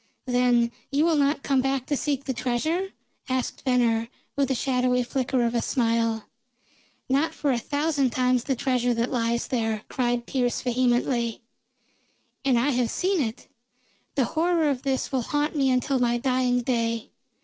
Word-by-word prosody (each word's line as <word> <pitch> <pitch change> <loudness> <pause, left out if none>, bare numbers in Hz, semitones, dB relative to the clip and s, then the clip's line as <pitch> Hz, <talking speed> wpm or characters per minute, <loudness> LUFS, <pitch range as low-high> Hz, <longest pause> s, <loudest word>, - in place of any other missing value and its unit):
"Then 245 -2 +2 0.2
you 290 +3 +3
will 335 -1 +3
not 285 0 +1
come 270 -2 +2
back 270 -1 -1
to 290 - 0
seek 280 -1 -1
the 265 - -2
treasure?" 265 +10 -1 0.4
asked 255 -1 -2
Venner, 235 -3 +2 0.3
with 275 -2 +1
a 265 - +1
shadowy 250 0 +1
flicker 255 0 0
of 235 0 0
a 235 - +1
smile. 230 -3 0 0.8
"Not 280 +5 +1
for 285 - 0
a 245 - +1
thousand 285 0 0
times 250 0 +1
the 270 - 0
treasure 245 -1 +1
that 230 +2 -1
lies 235 -1 0
there!" 225 -4 -1
cried 245 -2 0
Pearse 245 -2 0
vehemently. 245 -2 0 1.0
"And 265 -3 +3
I 260 +5 +2
have 245 -3 +1
seen 370 - 0
it! 225 -2 -4 0.7
The 270 -3 +2
horror 325 0 +1
of 255 -2 -3
this 270 -1 -1
will 265 -2 +1
haunt 295 +5 -1
me 275 -2 +2
until 255 +1 +1
my 240 -1 +2
dying 250 0 +1
day. 230 -2 -1
255 Hz, 165 wpm, -25 LUFS, 240-275 Hz, 1.0 s, you